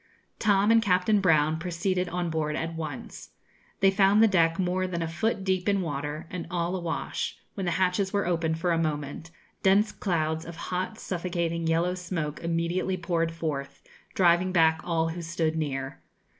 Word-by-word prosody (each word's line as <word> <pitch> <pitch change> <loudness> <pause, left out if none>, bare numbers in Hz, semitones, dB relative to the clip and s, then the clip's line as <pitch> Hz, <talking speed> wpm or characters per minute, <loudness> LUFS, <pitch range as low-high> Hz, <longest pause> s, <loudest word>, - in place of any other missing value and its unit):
Tom 205 0 +3
and 230 0 +6
Captain 200 0 +3
Brown 155 -3 +3
proceeded 180 +1 -1
on 175 -1 -2
board 155 -1 -1
at 165 0 -3
once. 155 -4 -7 0.5
They 195 0 +6
found 195 +1 +4
the - - +7
deck 165 -4 +3
more 185 0 0
than 170 -2 -2
a - - -2
foot 195 +5 -1
deep 190 0 0
in 200 -1 +2
water, 145 0 -4
and 180 -2 -5
all 175 0 -1
a - - -2
wash; 170 -2 -3 0.2
when 195 -3 -4
the 175 - +1
hatches 190 +2 +1
were 200 -1 0
opened 165 -2 0
for 175 +2 0
a 165 - +2
moment 150 0 -3 0.3
dense 200 +3 +4
clouds 160 -4 -1
of 170 0 -8
hot 185 +5 -3
suffocating 170 -3 -2
yellow 170 +2 +2
smoke 170 -5 -4
immediately 170 +3 0
poured 170 -1 0
forth, 155 -4 -4 0.3
driving 180 0 +4
back 160 -2 +4
all 165 -2 0
who 170 +2 -5
stood 165 -1 -1
near. 135 -4 -3
170 Hz, 175 wpm, -27 LUFS, 160-185 Hz, 0.5 s, the